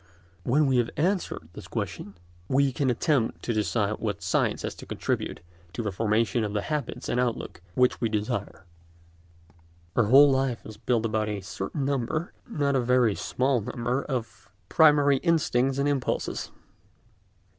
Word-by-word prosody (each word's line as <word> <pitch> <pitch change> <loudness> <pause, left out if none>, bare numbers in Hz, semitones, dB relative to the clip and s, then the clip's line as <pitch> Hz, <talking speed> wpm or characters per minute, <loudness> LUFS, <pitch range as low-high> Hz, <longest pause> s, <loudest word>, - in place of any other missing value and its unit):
When 145 - +3
we 130 -2 +2
have 120 -1 +2
answered 170 - -1
this - - -10
question 100 - -5 0.3
we 135 +3 +3
can 130 +1 0
attempt 125 0 0
to 120 - -1
decide 105 -1 0
what 105 -3 -3
science - - 0
has - - -3
to - - -11
contribute - - -3 0.3
to 115 - -3
the 105 - -2
formation 110 +3 +1
of 105 -1 -3
the 105 -1 -1
habits 150 -2 -3
and 120 - 0
outlook 120 -6 -2
which 125 0 +2
we 115 - +1
desire. 105 -3 -3 1.3
Our 115 - +4
whole 140 +6 +7
life 130 -3 0
is 110 -1 -9
built 115 +1 0
about 110 -1 0
a 105 -2 -3
certain 95 +9 -4
number—not 140 - -2
a 130 - +3
very 125 -3 +3
small 130 +3 0
number—of 120 0 -3 0.2
primary 145 -3 +5
instincts 135 -5 +1
and 140 +1 +1
impulses. 140 -3 -1
125 Hz, 150 wpm, -27 LUFS, 110-140 Hz, 1.3 s, whole